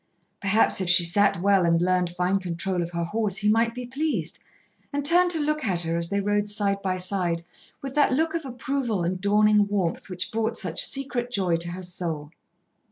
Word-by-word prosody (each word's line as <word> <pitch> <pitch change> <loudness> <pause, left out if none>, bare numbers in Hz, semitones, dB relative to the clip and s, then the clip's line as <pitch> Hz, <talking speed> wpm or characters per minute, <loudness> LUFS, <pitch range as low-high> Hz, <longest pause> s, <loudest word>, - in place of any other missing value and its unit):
Perhaps 200 0 +3
if 185 - -1
she 175 -1 +6
sat 175 +2 +3
well, 195 0 +3
and 170 -1 +2
learned 180 0 +1
fine 180 +2 0
control 180 0 -3
of 170 - -3
her 170 0 -3
horse, 210 +2 -1
he 210 - -1
might 230 +2 +2
be 250 0 -6
pleased, 255 - -3 0.5
and 285 -1 -3
turn 355 +3 +5
to 335 -2 +1
look 305 0 -1
at 185 -5 0
her, 165 -1 -1
as 170 0 +2
they 200 - 0
rode 205 +1 0
side 200 -1 0
by 185 -1 -1
side, 180 -2 0 0.4
with 270 -1 -5
that 295 -1 +3
look 315 +5 0
of 335 -1 -3
approval 250 -5 -3
and 180 +2 -2
dawning 210 0 +3
warmth 195 -5 -2
which 185 +1 -4
brought 225 +1 -2
such 180 -3 0
secret 260 -3 -1
joy 190 -7 0
to 170 +1 -3
her 185 +2 -7
soul. 165 -4 -5
200 Hz, 205 wpm, -25 LUFS, 175-230 Hz, 0.5 s, she